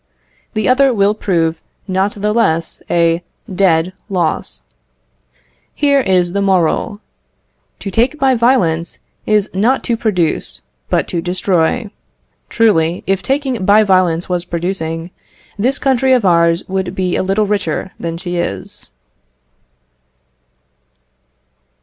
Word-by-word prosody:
The 215 -2 0
other 270 +1 +4
will 200 0 +3
prove 165 -6 -1 0.3
not 190 +2 0
the 210 +1 -1
less 165 -8 0
a 170 0 +2 0.3
dead 180 -2 +2 0.2
loss. 180 -4 -2 1.1
Here 285 -1 +3
is 180 -5 +1
the 200 - 0
moral: 195 +2 +1 0.8
To 195 - -5
take 240 +9 +1
by 270 -2 +3
violence 190 -10 +1 0.3
is 210 -2 +2
not 225 +8 +1
to 235 - 0
produce, 170 - -1 0.3
but - - +1
to 170 - -2
destroy. 185 +4 0 0.6
Truly, 180 -7 +2
if 195 0 0
taking 265 -5 -1
by 205 +3 +5
violence 185 -4 +2
was 180 -1 -1
producing, 170 -1 -3 0.5
this 255 +6 +1
country 265 -1 +2
of 245 -5 +2
ours 170 -1 +3
would 190 -1 -3
be 185 -2 -1
a - - +1
little 195 +3 +1
richer 195 -3 -2
than 165 0 -4
she 175 0 -4
is. 100 - -5
190 Hz, 120 wpm, -16 LUFS, 170-215 Hz, 1.1 s, by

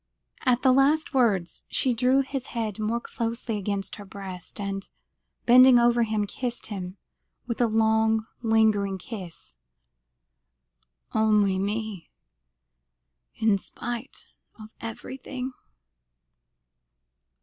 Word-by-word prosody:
At 245 -1 +3
the 260 - +6
last 280 +4 +3
words, 210 -9 +1
she 255 - +1
drew 255 +3 +3
his 270 -1 -4
head 220 -2 -2
more 220 +2 0
closely 230 -1 -3
against 200 -1 -2
her 205 - -8
breast, 190 -2 -8
and, 195 -1 -4 0.6
bending 255 +1 +8
over 240 0 +4
him, 215 -2 +1
kissed 245 +3 -4
him 185 -1 -6 0.5
with 235 -1 -3
a 240 - +4
long 220 0 +2 0.2
lingering 215 -4 +2
kiss. 185 -4 -9 1.6
"Only 210 -3 +3
me 205 -3 -3 1.3
in 215 -3 +2
spite 240 +6 -6 0.3
of 215 0 -11
everything?" 255 +3 -6
220 Hz, 105 wpm, -26 LUFS, 200-245 Hz, 1.6 s, bending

